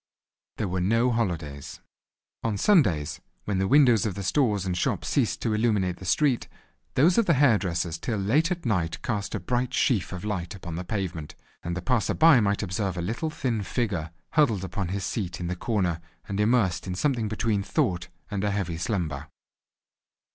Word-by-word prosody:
There 105 - -1
were 90 0 -1
no 115 +6 +2
holidays. 80 -11 -3 0.6
On 110 -3 0
Sundays, 100 - +2 0.2
when 100 -2 -1
the 95 - +1
windows 125 -5 +5
of 105 -4 -2
the 100 - -4
stores 105 -1 +1
and 90 -1 -1
shops 90 - -1
ceased - - 0
to 110 - +1
illuminate 105 -5 +1
the 95 - -10
street, 130 - +2 0.5
those 170 - +5
of 230 - +2
the 170 - +4
hair 130 -6 +5
dresser's 85 -3 -2
till 110 +5 -2
late 130 - +2
at 175 -4 -3
night 90 -8 0
cast 100 -4 -2
a - - -2
bright 125 0 -1
sheaf 115 -9 +1
of 90 +1 -6
light 95 -4 -3
upon 90 -3 -7
the 85 +3 -4
pavement, 90 -6 -4 0.3
and 85 +1 -3
the 90 - -5
passer 120 +2 +1
by 160 -5 +7
might 100 -1 +1
observe 95 0 -2
a - - -2
little 115 - -2
thin 125 -8 -2
figure 95 -7 -2 0.2
huddled 115 - +3
upon 95 -1 -3
his 95 +1 -3
seat 95 -4 -3
in 90 - -4
the 90 +1 -2
corner, 90 -5 -1 0.3
and 100 0 -3
immersed 105 -6 +2
in 90 - -3
something 120 0 0
between 105 -1 0
thought 90 -2 0 0.2
and 100 -1 -2
a 105 - +1
heavy 95 -5 -2
slumber. 85 -5 -2
100 Hz, 190 wpm, -26 LUFS, 90-115 Hz, 0.6 s, by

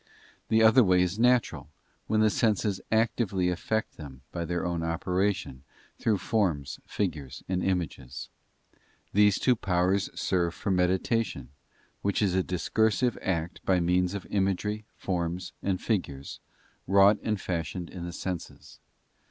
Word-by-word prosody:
The 110 0 +4
other 115 +3 +7
way 90 -2 +4
is 90 +4 -2
natural, 125 0 +2 0.4
when 110 0 +2
the 110 -1 +4
senses 105 -3 +1
actively 110 -5 +1
effect 110 +5 -2
them 70 -4 -10
by 85 -1 -3
their 85 +1 -2
own 85 -1 -1
operation, 90 -3 -1 0.4
through 110 -3 +2
forms, 90 -9 -1
figures, 75 -10 -3
and 95 -1 -1
images. 85 -9 -3 0.8
These 105 -1 +5
two 125 - +3
powers 95 0 +1
serve 85 -2 0
for 100 - -2
meditation, 90 - 0 0.5
which 100 0 0
is 100 -4 +2
a 95 - +3
discursive 110 +7 +1
act 85 -2 -2
by 95 -1 +3
means 90 +2 +1
of 100 - -5
imagery, 105 +2 0
forms, 90 -1 -3
and 95 -2 -1
figures, 70 -11 -3 0.5
wrought 100 +2 +6
and 110 -2 -1
fashioned 85 0 -4
in 90 - -7
the 85 - -5
senses. 90 0 -6
95 Hz, 135 wpm, -28 LUFS, 85-105 Hz, 0.8 s, other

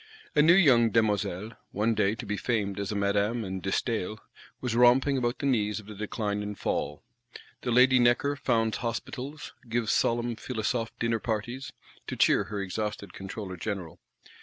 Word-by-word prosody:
A 150 - +6
new 165 +3 +7
young 130 -11 +6
Demoiselle, 105 -2 0 0.2
one 110 +3 +1
day 105 -1 +1
to - - -7
be 105 - -2
famed 100 -3 -1
as 100 +1 -3
a - - -3
Madame 100 +3 +1
and 95 -1 -4
De 95 - -3
Staël, 110 0 -1 0.4
was 125 -3 -2
romping 125 +3 +5
about 120 -1 0
the - - -4
knees 110 -6 +1
of 110 - -12
the 105 - -9
Decline 105 0 -3
and 105 -1 -5
Fall: 75 +6 -2 0.6
the - - -3
lady 125 +2 +6
Necker 120 +4 +3
founds 115 -5 +1
Hospitals; 130 +4 -5 0.2
gives 115 -1 0
solemn 120 0 +1
Philosophe 115 0 -2
dinner 115 -1 0
parties, 120 +4 -3 0.4
to - - -3
cheer - - +4
her 105 -1 -5
exhausted 100 0 -4
Controller 95 -1 -6
General. 90 -4 -5
110 Hz, 170 wpm, -28 LUFS, 105-120 Hz, 0.6 s, new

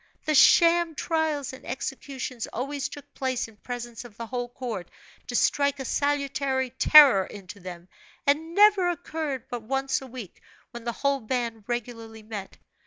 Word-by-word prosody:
The 310 - +1
sham 335 +2 +5
trials 310 -5 -1
and 260 - -11
executions 260 -2 -5
always 275 +4 -3
took 290 - -12
place 260 -3 -2
in 220 -2 -18
presence 240 0 -7
of 235 -4 -14
the 230 - -5
whole 245 +1 -4
court, 235 -8 -6 0.4
to 245 - -4
strike 280 +2 +2
a 265 - -4
salutary 275 -2 0
terror 265 -6 +8
into 200 0 -10
them, 175 -1 -9 0.4
and 320 +4 +1
never 410 -3 +6
occurred 310 -5 -4
but 245 -1 -5
once 270 +4 -1
a 265 - -9
week, 240 -7 -10 0.3
when 235 -1 -9
the 235 - 0
whole 280 0 +3
band 230 -2 -3
regularly 230 -2 -5
met. 210 -3 -8
260 Hz, 160 wpm, -26 LUFS, 230-285 Hz, 0.4 s, terror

